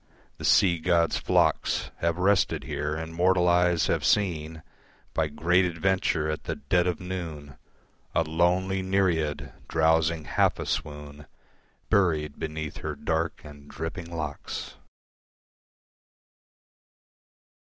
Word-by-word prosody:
The -, -, -4 dB
sea 85 Hz, -3 st, +4 dB
god's 85 Hz, 0 st, +2 dB
flocks -, -, +1 dB
Have 85 Hz, 0 st, 0 dB
rested 95 Hz, +1 st, +2 dB
here, 75 Hz, +1 st, -3 dB
and 80 Hz, +1 st, -6 dB
mortal 90 Hz, +1 st, +3 dB
eyes 90 Hz, -1 st, +3 dB
have -, -, 0 dB
seen 80 Hz, -6 st, 0 dB, 0.5 s
By 80 Hz, -1 st, +1 dB
great 85 Hz, +5 st, +2 dB
adventure 90 Hz, -2 st, 0 dB
at 75 Hz, 0 st, -4 dB
the -, -, -2 dB
dead 90 Hz, +5 st, +1 dB
of 90 Hz, -3 st, -1 dB
noon 80 Hz, -7 st, -6 dB, 0.6 s
A -, -, +3 dB
lonely 90 Hz, +4 st, +1 dB
nereid 95 Hz, -6 st, 0 dB
drowsing 80 Hz, 0 st, +2 dB
half -, -, +2 dB
a -, -, -5 dB
swoon 75 Hz, 0 st, -5 dB, 0.6 s
Buried 80 Hz, -7 st, +1 dB
beneath 80 Hz, -1 st, -5 dB
her -, -, -4 dB
dark 80 Hz, +1 st, -2 dB
and 75 Hz, -1 st, -13 dB
dripping 80 Hz, +2 st, -6 dB
locks. 75 Hz, -4 st, -5 dB
80 Hz, 115 wpm, -27 LUFS, 75-90 Hz, 0.6 s, sea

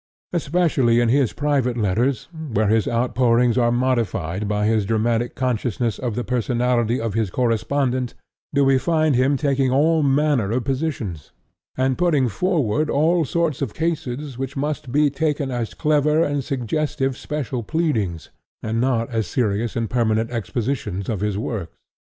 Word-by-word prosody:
Especially 145 Hz, -7 st, +2 dB
in 120 Hz, -1 st, +2 dB
his 135 Hz, -1 st, +3 dB
private 140 Hz, -4 st, 0 dB
letters, 110 Hz, +4 st, 0 dB
where 140 Hz, -10 st, -1 dB
his 110 Hz, -1 st, +2 dB
outpourings 120 Hz, 0 st, +2 dB
are 120 Hz, -2 st, +3 dB
modified 110 Hz, -7 st, 0 dB
by 105 Hz, 0 st, 0 dB
his 110 Hz, -1 st, +2 dB
dramatic 115 Hz, +2 st, 0 dB
consciousness 120 Hz, -2 st, -1 dB
of 120 Hz, -4 st, -3 dB
the 120 Hz, -, -2 dB
personality 120 Hz, -1 st, 0 dB
of 115 Hz, -3 st, -2 dB
his 110 Hz, -2 st, 0 dB
correspondent, 125 Hz, +3 st, 0 dB, 0.4 s
do 140 Hz, 0 st, +3 dB
we 135 Hz, -1 st, +4 dB
find 155 Hz, +1 st, +2 dB
him 130 Hz, +3 st, +2 dB
taking 135 Hz, -2 st, +1 dB
all 155 Hz, +5 st, +3 dB
manner 140 Hz, -6 st, +2 dB
of 120 Hz, +3 st, 0 dB
positions, 130 Hz, -, -3 dB, 0.4 s
and 130 Hz, +1 st, +1 dB
putting 155 Hz, -7 st, +3 dB
forward 150 Hz, -, 0 dB
all 165 Hz, +4 st, +2 dB
sorts 160 Hz, -1 st, -1 dB
of 130 Hz, -7 st, -3 dB
cases 145 Hz, -5 st, -3 dB
which 135 Hz, +1 st, -4 dB
must 145 Hz, -1 st, -3 dB
be 145 Hz, +1 st, +3 dB
taken 145 Hz, -2 st, -1 dB
as 115 Hz, -7 st, -3 dB
clever 150 Hz, +1 st, +2 dB
and 145 Hz, -2 st, -1 dB
suggestive 135 Hz, +1 st, -1 dB
special 135 Hz, -4 st, -4 dB
pleadings, 110 Hz, -, -1 dB, 0.3 s
and 110 Hz, +1 st, -1 dB
not 120 Hz, -3 st, +1 dB
as 110 Hz, -4 st, -1 dB
serious 110 Hz, -1 st, -1 dB
and 115 Hz, -1 st, -1 dB
permanent 115 Hz, -1 st, +1 dB
expositions 115 Hz, -3 st, -3 dB
of 110 Hz, -4 st, -1 dB
his 105 Hz, 0 st, -1 dB
works. 105 Hz, -5 st, -4 dB
125 Hz, 150 wpm, -22 LUFS, 115-145 Hz, 0.4 s, we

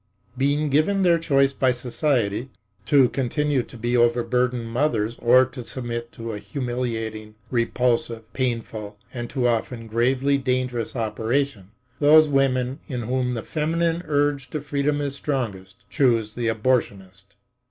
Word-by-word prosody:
Being 145 Hz, +3 st, +1 dB
given 190 Hz, +8 st, +2 dB
their 170 Hz, -2 st, +4 dB
choice 140 Hz, -4 st, +2 dB
by 130 Hz, -2 st, +2 dB
society—to 120 Hz, -, 0 dB
continue 140 Hz, +1 st, 0 dB
to 120 Hz, -, -11 dB
be 120 Hz, +2 st, -1 dB
overburdened 120 Hz, +1 st, +2 dB
mothers 115 Hz, -3 st, 0 dB
or 125 Hz, +2 st, +6 dB
to 125 Hz, -1 st, -9 dB
submit 120 Hz, -1 st, -5 dB
to 115 Hz, -1 st, -6 dB
a 105 Hz, -, -5 dB
humiliating, 115 Hz, -4 st, -4 dB, 0.2 s
repulsive, 120 Hz, -1 st, 0 dB
painful 115 Hz, -5 st, -3 dB, 0.2 s
and 120 Hz, -2 st, -5 dB
too 125 Hz, -3 st, 0 dB
often 115 Hz, 0 st, -1 dB
gravely 130 Hz, +5 st, +1 dB
dangerous 125 Hz, -3 st, -1 dB
operation, 115 Hz, -1 st, -1 dB, 0.3 s
those 150 Hz, +1 st, +6 dB
women 135 Hz, -1 st, +1 dB
in 125 Hz, -3 st, -4 dB
whom 125 Hz, +1 st, -1 dB
the 115 Hz, -, -4 dB
feminine 165 Hz, +2 st, 0 dB
urge 145 Hz, -2 st, 0 dB
to 150 Hz, -, -3 dB
freedom 145 Hz, 0 st, -1 dB
is 140 Hz, -1 st, -3 dB
strongest 100 Hz, -10 st, -4 dB
choose 115 Hz, -3 st, +1 dB
the 120 Hz, 0 st, -2 dB
abortionist. 100 Hz, -5 st, -1 dB
125 Hz, 130 wpm, -23 LUFS, 115-140 Hz, 0.3 s, or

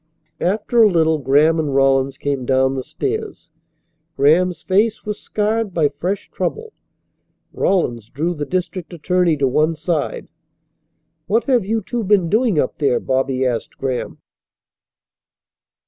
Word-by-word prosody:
After 210 Hz, +5 st, +1 dB
a 215 Hz, -, +7 dB
little 160 Hz, -3 st, +2 dB
Graham 150 Hz, +4 st, +3 dB
and 145 Hz, -3 st, -1 dB
Rawlins 135 Hz, 0 st, +2 dB
came 140 Hz, -2 st, -2 dB
down 130 Hz, +1 st, +2 dB
the 135 Hz, -, -3 dB
stairs. 415 Hz, -, -5 dB, 0.7 s
Graham's 165 Hz, +4 st, +3 dB
face 210 Hz, +4 st, +1 dB
was 210 Hz, 0 st, -4 dB
scarred 215 Hz, -1 st, -2 dB
by 155 Hz, -4 st, +3 dB
fresh 180 Hz, +8 st, -4 dB
trouble. 450 Hz, -1 st, -4 dB, 0.8 s
Rawlins 120 Hz, -, 0 dB
drew 165 Hz, +6 st, -2 dB
the 145 Hz, -3 st, -5 dB
district 180 Hz, 0 st, -3 dB
attorney 175 Hz, 0 st, +1 dB
to 140 Hz, -1 st, +1 dB
one 155 Hz, +5 st, +1 dB
side. 160 Hz, -1 st, -2 dB, 1.0 s
"What 225 Hz, +3 st, +2 dB
have 245 Hz, -8 st, +1 dB
you 220 Hz, 0 st, -1 dB
two 240 Hz, +3 st, -3 dB
been 190 Hz, -4 st, +2 dB
doing 220 Hz, -4 st, +2 dB
up 130 Hz, -, -1 dB
there?" 140 Hz, -4 st, +2 dB
Bobby 130 Hz, 0 st, 0 dB
asked 120 Hz, -3 st, -3 dB
Graham. 130 Hz, -2 st, -3 dB
165 Hz, 135 wpm, -19 LUFS, 135-205 Hz, 1.0 s, a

